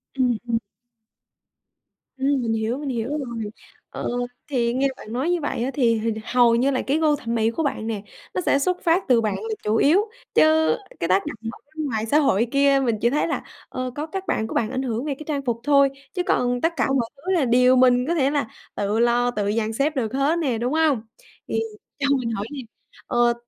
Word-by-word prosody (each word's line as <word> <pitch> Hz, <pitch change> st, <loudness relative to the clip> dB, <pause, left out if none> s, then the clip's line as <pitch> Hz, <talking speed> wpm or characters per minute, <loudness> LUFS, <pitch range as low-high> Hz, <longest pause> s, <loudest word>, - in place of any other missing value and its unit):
Ừm, 250 Hz, -3 st, +2 dB
ừm. 230 Hz, -1 st, +2 dB, 1.6 s
Ừm, 270 Hz, -1 st, +1 dB
mình 225 Hz, -1 st, 0 dB
hiểu, 225 Hz, +4 st, -1 dB
mình 290 Hz, -2 st, -5 dB
hiểu 235 Hz, -1 st, -2 dB
rồi. 235 Hz, -7 st, -4 dB, 0.4 s
Ờ, -, -, -4 dB, 0.4 s
thì 235 Hz, -4 st, +1 dB
nghe 275 Hz, +1 st, +2 dB
bạn 215 Hz, -, -10 dB
nói 270 Hz, +8 st, 0 dB
như 355 Hz, -, +1 dB
vậy 285 Hz, -5 st, -2 dB
á, 265 Hz, -, -1 dB
thì 235 Hz, -5 st, +3 dB
hình 225 Hz, 0 st, -1 dB
hầu 240 Hz, -2 st, +4 dB
như 255 Hz, +4 st, +2 dB
là 260 Hz, -, 0 dB
cái 285 Hz, +4 st, 0 dB
gu 305 Hz, -2 st, +3 dB
thẩm 235 Hz, -4 st, -4 dB
mỹ 225 Hz, 0 st, +2 dB
của 320 Hz, +8 st, -2 dB
bạn 270 Hz, -6 st, -2 dB
nè, 215 Hz, -3 st, -3 dB, 0.3 s
nó -, -, 0 dB
sẽ 280 Hz, -, +2 dB
xuất 360 Hz, +5 st, 0 dB
phát 340 Hz, +3 st, +2 dB
từ 240 Hz, -2 st, +5 dB
bạn 215 Hz, -3 st, 0 dB
là 445 Hz, 0 st, -3 dB
chủ 215 Hz, +1 st, +1 dB
yếu, 385 Hz, -, +4 dB, 0.3 s
chứ 315 Hz, +7 st, +4 dB, 0.2 s
cái 165 Hz, -, -1 dB
tác 190 Hz, +6 st, +2 dB
động 295 Hz, -6 st, -5 dB, 0.2 s
ở -, -, -12 dB, 0.2 s
bên 310 Hz, -1 st, -2 dB
ngoài 220 Hz, -4 st, -2 dB
xã 290 Hz, +7 st, +3 dB
hội 235 Hz, -7 st, +3 dB
kia 275 Hz, 0 st, +4 dB
mình 230 Hz, -3 st, +1 dB
chỉ 235 Hz, -, +3 dB
thấy 295 Hz, -, +1 dB
là, -, -, -2 dB, 0.3 s
ờ, 255 Hz, 0 st, -4 dB
có 300 Hz, +1 st, -3 dB
các 385 Hz, +4 st, -5 dB
bạn 220 Hz, -, 0 dB
của -, -, -7 dB
bạn 220 Hz, -1 st, 0 dB
ảnh 260 Hz, 0 st, -2 dB
hưởng 240 Hz, -1 st, -2 dB
về 290 Hz, -2 st, -2 dB
cái 305 Hz, -, -10 dB
trang 285 Hz, -3 st, -2 dB
phục 235 Hz, -2 st, -1 dB
thôi, 280 Hz, -1 st, +5 dB, 0.2 s
chứ 360 Hz, -2 st, -1 dB
còn 245 Hz, 0 st, +1 dB
tất 330 Hz, +4 st, +2 dB
cả -, -, +2 dB
mọi 260 Hz, -4 st, +1 dB
thứ 360 Hz, +7 st, -3 dB
là 335 Hz, -7 st, +3 dB
điều 250 Hz, +1 st, +5 dB
mình 250 Hz, -1 st, +5 dB
có 340 Hz, -, +2 dB
thể 275 Hz, -3 st, +2 dB
là 285 Hz, -6 st, 0 dB, 0.3 s
tự 205 Hz, +2 st, -1 dB
lo, 240 Hz, +1 st, +3 dB
tự 205 Hz, -3 st, -1 dB
dàn 225 Hz, -1 st, 0 dB
xếp 285 Hz, +6 st, 0 dB
được 230 Hz, -4 st, -1 dB
hết 280 Hz, +5 st, +1 dB
nè, 260 Hz, -8 st, 0 dB
đúng 245 Hz, +4 st, -1 dB
hông? 310 Hz, -7 st, +3 dB, 0.5 s
Thì 225 Hz, -, 0 dB, 0.4 s
cho 280 Hz, -, 0 dB
mình 235 Hz, -3 st, -2 dB
hỏi 205 Hz, -1 st, -3 dB
nè, 280 Hz, -, -5 dB, 0.5 s
ờ, 240 Hz, 0 st, +3 dB
255 Hz, 235 wpm, -23 LUFS, 230-290 Hz, 1.6 s, từ